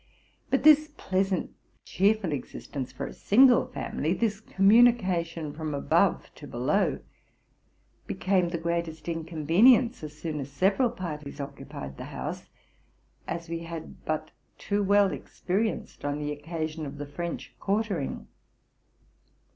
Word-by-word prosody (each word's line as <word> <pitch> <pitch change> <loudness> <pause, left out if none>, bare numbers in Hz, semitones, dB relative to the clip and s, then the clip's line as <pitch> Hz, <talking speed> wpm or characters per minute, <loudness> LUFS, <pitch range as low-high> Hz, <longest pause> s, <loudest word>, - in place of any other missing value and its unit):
But 270 - +1
this 305 0 +7
pleasant, 190 -1 0 0.3
cheerful 200 -1 +2
existence 135 -1 -5
for 130 - -5
a - - -7
single 245 +3 +5
family 160 +5 -2
—this 215 -2 0
communication 190 -8 +3
from 155 -1 -4
above 140 - +1
to - - -11
below - - 0 0.5
— - - -40
became 185 -2 +1
the 170 - -2
greatest 165 -2 -3
Inconyenience 170 - +3
as 150 0 -8
soon 155 -1 -4
as 135 -1 -5
several 195 - +2
parties 155 -10 -6
occupied 135 - -7
the - - -6
house, - - -6 0.8
as 170 0 -4
we 165 0 -3
had 165 -1 -8
but 155 -1 -3 0.3
too 205 0 -1
well 200 -1 +4
experienced 210 +5 -3
on 145 0 -1
the 150 0 -3
occasion 155 +1 -4
of 140 +1 -8
the 145 - -5
French 170 +4 -5
quartering. 200 -7 -1
170 Hz, 130 wpm, -28 LUFS, 150-200 Hz, 0.8 s, this